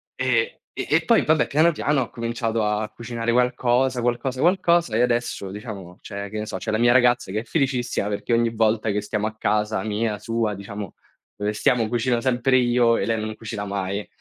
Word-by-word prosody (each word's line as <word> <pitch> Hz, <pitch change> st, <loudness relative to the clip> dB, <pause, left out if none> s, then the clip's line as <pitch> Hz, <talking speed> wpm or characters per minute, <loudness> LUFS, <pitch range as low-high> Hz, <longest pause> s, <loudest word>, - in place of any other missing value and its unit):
e -, -, 0 dB, 0.2 s
e -, -, -4 dB
e -, -, +2 dB
poi 230 Hz, -, +4 dB
vabbè, 155 Hz, 0 st, +3 dB
piano 155 Hz, +4 st, +4 dB
piano 150 Hz, -3 st, 0 dB
ho 120 Hz, -, -3 dB
cominciato 115 Hz, -1 st, -2 dB
a 105 Hz, +1 st, -1 dB
cucinare 115 Hz, +1 st, -3 dB
qualcosa, 125 Hz, 0 st, +2 dB
qualcosa, 120 Hz, +2 st, -1 dB
qualcosa, 170 Hz, -, +3 dB
e 120 Hz, -, +3 dB
adesso 120 Hz, -5 st, -1 dB
diciamo 100 Hz, -4 st, -8 dB
c'è 100 Hz, -1 st, -6 dB
che 110 Hz, +1 st, -5 dB
ne 105 Hz, -, -3 dB
so, -, -, -4 dB
c'è 95 Hz, -, -4 dB
la 110 Hz, -, 0 dB
mia 120 Hz, 0 st, +5 dB
ragazza 120 Hz, -5 st, +3 dB
che 110 Hz, -, -1 dB
è -, -, -11 dB
felicissima 125 Hz, -5 st, -1 dB
perché 105 Hz, +3 st, -2 dB
ogni 115 Hz, 0 st, +3 dB
volta 110 Hz, 0 st, +1 dB
che 105 Hz, +1 st, -1 dB
stiamo 105 Hz, +1 st, -2 dB
a 110 Hz, -, -6 dB
casa 105 Hz, 0 st, 0 dB
mia, 110 Hz, 0 st, -1 dB
sua, 115 Hz, -1 st, -1 dB
diciamo, 100 Hz, 0 st, -7 dB, 0.4 s
dove 105 Hz, +1 st, -2 dB
stiamo, 115 Hz, +1 st, +2 dB
cucino 120 Hz, +1 st, 0 dB
sempre 130 Hz, 0 st, +2 dB
io 120 Hz, -1 st, +3 dB
e -, -, -1 dB
lei 115 Hz, -1 st, 0 dB
non 110 Hz, 0 st, -4 dB
cucina 105 Hz, -2 st, -6 dB
mai. 100 Hz, +1 st, -3 dB
115 Hz, 205 wpm, -23 LUFS, 105-125 Hz, 0.4 s, mia